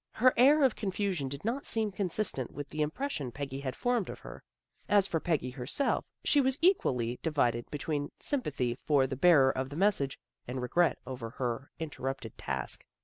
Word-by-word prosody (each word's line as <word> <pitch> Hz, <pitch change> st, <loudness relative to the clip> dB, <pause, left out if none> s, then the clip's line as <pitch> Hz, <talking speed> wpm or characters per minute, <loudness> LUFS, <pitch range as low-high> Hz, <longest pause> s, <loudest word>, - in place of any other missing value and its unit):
Her 255 Hz, +2 st, +4 dB
air 285 Hz, +5 st, +6 dB
of 260 Hz, -4 st, +4 dB
confusion 190 Hz, -7 st, -1 dB
did 140 Hz, +6 st, -7 dB
not 250 Hz, +5 st, -1 dB
seem 220 Hz, -2 st, +1 dB
consistent 185 Hz, -, -2 dB
with 145 Hz, 0 st, -7 dB
the 155 Hz, -, -3 dB
impression 150 Hz, -, -2 dB
Peggy 135 Hz, 0 st, -5 dB
had 135 Hz, -2 st, -4 dB
formed 245 Hz, -5 st, 0 dB
of -, -, -6 dB
her. -, -, -10 dB, 0.5 s
As 205 Hz, -2 st, +5 dB
for 165 Hz, -, -1 dB
Peggy 155 Hz, -7 st, -1 dB
herself, 130 Hz, -, -1 dB, 0.2 s
she 290 Hz, -, +4 dB
was 265 Hz, 0 st, +1 dB
equally 125 Hz, -, +2 dB
divided 120 Hz, -7 st, 0 dB
between 145 Hz, 0 st, -3 dB
sympathy 145 Hz, -, -1 dB
for 135 Hz, +2 st, +2 dB
the 130 Hz, 0 st, -3 dB
bearer 140 Hz, -3 st, +6 dB
of 130 Hz, 0 st, -3 dB
the 145 Hz, -, -7 dB
message, 175 Hz, -7 st, +2 dB, 0.3 s
and 125 Hz, +1 st, -3 dB
regret 165 Hz, +7 st, +2 dB
over 125 Hz, -3 st, -5 dB
her 125 Hz, +2 st, -3 dB
interrupted 135 Hz, -6 st, -5 dB
task. -, -, -3 dB
150 Hz, 175 wpm, -31 LUFS, 130-205 Hz, 0.5 s, air